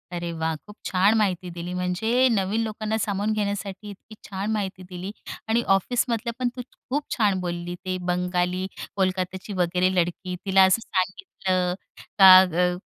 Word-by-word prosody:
अरे 170 0 -3
वाह! 160 -1 -2
खूप 210 - -13
छान 190 +3 +4
माहिती 185 -4 0
दिली. 175 +1 -6
म्हणजे 200 +8 +1
नवीन 205 +1 0
लोकांना 215 0 -2
सामावून 205 0 -1
घेण्यासाठी 205 -1 -3
इतकी 205 +2 -12
छान 200 +2 -3
माहिती 195 -3 -3
दिली. 180 +2 -6 0.4
आणि 225 +2 +2
ऑफिसमधलं 235 +3 -1
पण 250 -1 +1
तू 250 - -5 0.3
खूप 290 +3 0
छान 205 -5 +2
बोलली. 175 -1 -4
ते 185 0 -1
बंगाली, 180 +1 0 0.3
कोलकात्याची 185 +1 -2
वगैरे 180 0 +1
लडकी, 180 +1 -1
तिला 190 -1 +5
असं 190 +4 +3
सांगितलं, 185 - -1 0.5
का 190 -1 +11
अ, 180 0 +1
190 Hz, 150 wpm, -24 LUFS, 180-210 Hz, 0.5 s, का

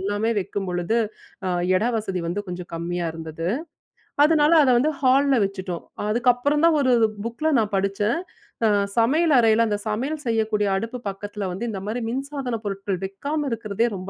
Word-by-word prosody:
எல்லாமே 205 +4 0
வக்கிம்பொழுது, 185 +3 -2 0.5
அ, - - 0 0.3
எட - - -1
வசதி 195 -5 -3
வந்து, 185 +5 -2
கொஞ்ச 180 0 -5
கம்மியா 170 +1 -2
இருந்தது. 165 +1 -5 0.8
அதனால, 305 -1 +4
அத 265 - +3
வந்து, 305 +4 +2
ஹால்ல 270 0 +4
வச்சுட்டோம். 190 -3 -5 0.2
அதுக்கப்புறம் 245 +6 +2
தான், 320 -2 +4
ஒரு 255 -2 +3 0.3
புக்ல 305 +7 -1
நான் 210 -1 -1
படுச்சேன். 200 +8 0 0.5
அ, - - +5 0.3
சமையல் 300 +7 +3
அறையில, 225 0 +4
அந்த 205 -1 -1
சமையல் 275 +8 -2
செய்யக்கூடிய 220 -2 +1
அடுப்பு 230 +4 -4
பக்கத்தில 205 0 -5
வந்து, 190 +6 -5
இந்த 195 -3 -5
மாரி 230 +3 -2
மின்சாதனப் 265 -4 -4
பொருட்கள் 195 -2 -3
வக்காம 285 +10 -3
இருக்குறதே, 225 0 0
ரொம்ப 185 +1 -7
220 Hz, 155 wpm, -23 LUFS, 195-260 Hz, 0.8 s, அ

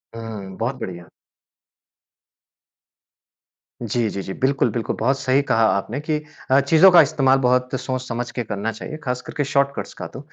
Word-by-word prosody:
हुँ, 110 -4 -7
बहुत 125 +3 -2
बढ़िया। 85 -2 -7 2.7
जी, 115 0 0
जी, 100 - -4
जी। 95 - -6
बिल्कुल, 135 +5 +1
बिल्कुल 115 -3 -2
बहुत 135 +4 +1
सही 135 0 +2
कहा 115 -5 +1
आपने 110 +7 -3
कि 150 0 -2 0.3
अ, 135 - +6
चीज़ों 160 +7 +6
का 175 - +9
इस्तेमाल 135 -3 +3
बहुत 125 0 +2
सोच 130 -1 -3
समझ 120 0 -3
के 120 - -3
करना 105 0 -3
चाहिए। 115 +7 -7
ख़ास 125 -2 -2
करके 145 - -3
शॉर्टकट्स 140 0 -1
का - - -7
तो। - - -7
125 Hz, 165 wpm, -22 LUFS, 115-140 Hz, 2.7 s, का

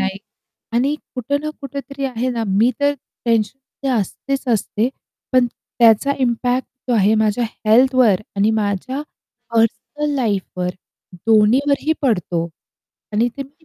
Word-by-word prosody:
नाही. 195 0 -1 0.6
आणि 270 +5 +2 0.2
कुठं 280 +3 -1
ना 305 - -2
कुठेतरी 275 0 -6
आहे 255 -1 -1
ना, 230 -2 -2
मी 205 +5 +3
तर 285 0 +3 0.3
टेन्शनमध्ये 250 +4 -1
असतेच 270 +7 -4
असते. 215 +3 0 0.4
पण 255 -1 +5
त्याचा 235 +2 +2
इम्पॅक्ट 245 +1 0 0.2
जो 245 - +3
आहे 210 0 +4
माझ्या 220 +2 +2 0.2
हेल्थवर 245 -3 +5 0.2
आणि 205 +2 +3
माझ्या 220 +5 -1 0.5
पर्सनल 290 +6 0
लाईफवर 195 -6 -1 0.6
दोन्हीवरही 260 +8 +4
पडतो. 180 -9 0 0.6
आणि 225 +3 +2
ते 275 - -3
मी 285 +4 -19
240 Hz, 125 wpm, -20 LUFS, 215-275 Hz, 0.6 s, पण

